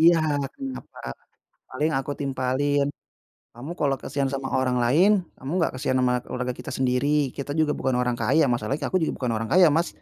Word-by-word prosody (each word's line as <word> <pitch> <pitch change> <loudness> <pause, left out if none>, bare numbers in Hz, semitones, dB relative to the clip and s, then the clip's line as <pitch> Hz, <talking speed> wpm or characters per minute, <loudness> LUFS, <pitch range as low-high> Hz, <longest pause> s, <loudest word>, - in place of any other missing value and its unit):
Iya, 170 +1 +7 0.4
kenapa? 270 -1 -8 0.7
Paling 155 +2 0
aku 135 +2 -3
timpalin, 140 +1 0 0.7
"Kamu 130 +8 -8
kalau 140 -2 +2
kasihan 140 -2 -1
sama 135 -1 -3
orang 125 -1 +1
lain, 160 +12 +4 0.3
kamu 135 +3 -6
nggak 165 - +2
kasihan 130 0 0
sama 125 -1 +3
keluarga 125 0 -3
kita 145 - -6
sendiri. 130 +1 +1 0.3
Kita 140 +1 -5
juga 150 -1 +3
bukan 130 -1 0
orang 125 -1 0
kaya!" 160 - +3
Masalahnya 135 +5 -1
kan - - 0
aku 185 - +3
juga 160 - 0
bukan 125 -3 -1
orang 110 0 -3
kaya 180 -1 +7
Mas. 165 +2 +2
135 Hz, 185 wpm, -25 LUFS, 125-155 Hz, 0.7 s, Iya